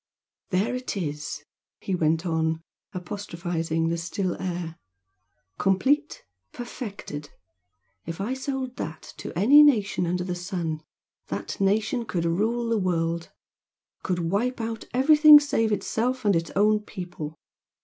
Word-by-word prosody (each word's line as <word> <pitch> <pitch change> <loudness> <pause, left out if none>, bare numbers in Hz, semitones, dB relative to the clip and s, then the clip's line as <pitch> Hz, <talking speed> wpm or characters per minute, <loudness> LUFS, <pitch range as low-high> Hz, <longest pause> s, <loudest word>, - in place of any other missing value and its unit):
"There 195 +6 +1
it 250 -4 -3
is!" 150 -4 -4 0.4
he 195 - -3
went 165 0 +1
on, 160 -1 0 0.3
apostrophising 170 -4 -3
the 170 0 -1
still 180 +2 -2
air 175 -3 -4 0.8
"Complete, 270 +11 +1 0.3
perfected! 205 - -7 0.8
If 165 +1 -5
I 215 +6 -1
sold 265 -1 -4
that 160 -2 -6
to - - -6
any 265 +11 +8
nation 210 -11 +3
under 180 +1 -1
the 180 0 -3
sun, 175 -3 -3 0.5
that - - -5
nation 215 +5 +1
could 175 -6 -2
rule 220 +8 0
the 225 -2 +2
world! 170 -2 -1 0.7
could 175 -2 -1
wipe 245 +6 0
out 225 0 -4
everything 300 +3 +8
save 225 -6 0
itself 245 +4 -1
and 200 -3 +4
its 165 0 0
own 210 +2 +4
people! 175 -7 -7
190 Hz, 130 wpm, -26 LUFS, 170-230 Hz, 0.8 s, any